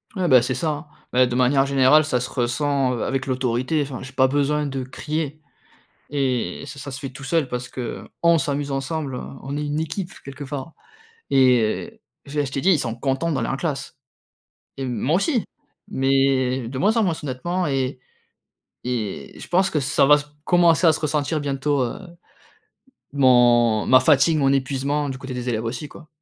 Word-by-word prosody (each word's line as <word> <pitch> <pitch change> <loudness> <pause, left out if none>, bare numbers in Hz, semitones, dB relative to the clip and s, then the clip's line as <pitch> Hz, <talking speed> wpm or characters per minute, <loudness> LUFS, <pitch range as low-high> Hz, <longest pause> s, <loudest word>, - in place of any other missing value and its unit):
Ouais, 185 -2 0
bah, 130 -5 +7
c'est 125 +1 -1
ça, 160 - -1
hein. 150 +1 -6 0.3
Beh, 125 0 +5
de 120 - -3
manière 130 +2 +3
générale, 140 +3 +5
ça 135 -4 0
se 125 - -4
ressent, 130 +1 0
heu, 120 - -3
avec 135 0 -2
l'autorité. 130 +3 0
Enfin, 135 -2 -7
j'ai 135 - -9
pas 130 0 +4
besoin 145 +2 +1
de 135 -2 -3
crier 150 +3 -4 0.7
et 135 -4 -1
ça 140 +1 -9
ça 140 - -7
se 130 - -6
fait 135 - -5
tout 130 +1 -11
seul 155 -1 0
parce 125 0 -4
que 125 -3 -6
on 170 0 +5
s'amuse 145 -1 -2
ensemble, 135 0 -3 0.3
on 140 +2 -5
est 150 - -2
une 145 +1 -2
équipe 170 +4 -4
quelque 140 +1 -8
part 140 +2 -6 0.6
et 130 - +2 0.2
déjà 145 +1 -2
je 135 - -5
t'ai 135 - -2
dit, 190 - +4
ils 165 - +3
sont 115 -3 -2
contents 135 +6 -1
d'aller 140 - -1
en - - -1
classe 140 -1 -4 0.8
et 135 - -5
moi 125 +5 0
aussi, 230 - +1 0.4
mais 135 -2 +1
de 130 +2 -6
moins 210 - +2
en 225 - +3
moins 180 -4 +1
honnêtement 175 +7 -2
et 135 -2 -1 0.9
et 120 -5 -4
je - - -9
pense 185 +2 +3
que 150 - -1
ça 140 0 +2
va 150 - +8
s 145 0 -5 0.2
commencer 175 -1 +4
à 160 - +7
se 155 - -3
ressentir 150 0 -1
bientôt, 140 0 0
heu, 120 - -3 1.2
mon 120 -4 +4
ma 130 - +7
fatigue, 145 +3 +4
mon 135 -2 +3
épuisement 140 +2 -1
du 135 - -4
côté 130 0 -7
des 125 0 -4
élèves 115 -2 -1
aussi 125 +6 -4
quoi. 155 +2 -14
135 Hz, 190 wpm, -22 LUFS, 130-150 Hz, 1.2 s, va